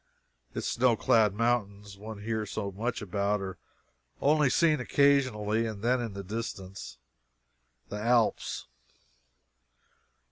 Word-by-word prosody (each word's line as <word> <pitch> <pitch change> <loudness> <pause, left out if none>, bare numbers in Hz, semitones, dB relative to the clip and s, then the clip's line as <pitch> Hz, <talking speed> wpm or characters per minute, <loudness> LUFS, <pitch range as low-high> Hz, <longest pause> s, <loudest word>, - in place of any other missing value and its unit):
Its - - -2
snow 120 -1 +3
clad 110 -2 +3
mountains 105 -3 -1
one 105 +1 -9
hears 110 -1 -2
so 100 -2 -3
much 115 +4 -3
about 100 +1 0
are 95 -2 -6 0.6
only 150 -1 +3
seen 155 +1 +3
occasionally, 125 -5 +2
and 105 -2 -6
then 125 +1 +2
in 115 -4 -4
the 100 0 -6
distance, 100 - -6 0.9
the 105 - -4
Alps. 115 -1 +1
110 Hz, 115 wpm, -29 LUFS, 100-120 Hz, 0.9 s, snow